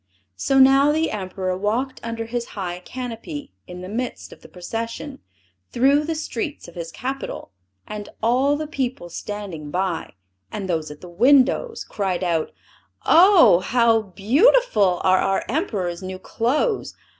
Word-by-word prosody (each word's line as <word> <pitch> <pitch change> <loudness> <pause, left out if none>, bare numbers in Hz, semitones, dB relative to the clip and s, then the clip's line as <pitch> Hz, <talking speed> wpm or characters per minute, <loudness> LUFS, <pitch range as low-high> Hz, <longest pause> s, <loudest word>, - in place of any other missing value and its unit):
So 270 - +1
now 270 +2 +6
the 315 +2 0
Emperor 185 -2 -3
walked 230 +8 -2
under 230 0 -4
his 235 +1 -3
high 180 -2 -4
canopy 255 - -7
in 180 -1 -8
the 185 - -7
midst 240 +5 -5
of - - -18
the - - -15
procession, 230 +9 -6 0.5
through 275 +5 +3
the 325 +1 -2
streets 310 0 -4
of 170 - -12
his 170 -1 -6
capital; 265 - -5 0.4
and 210 -1 -7
all 260 +5 +3
the 310 - -3
people 260 - -3
standing 185 -5 -6
by, 180 0 -2 0.4
and 195 -2 -4
those 160 -4 -2
at 150 0 -11
the 180 - -10
windows, 265 - +3
cried 190 -3 -2
out, 165 -3 0 0.5
"Oh! 350 - +7
How 230 +2 +3
beautiful 215 - +3
are 185 0 +4
our 195 0 0
Emperor's 200 - -2
new 185 0 -6
clothes! 270 - -1
225 Hz, 145 wpm, -22 LUFS, 185-275 Hz, 0.5 s, Oh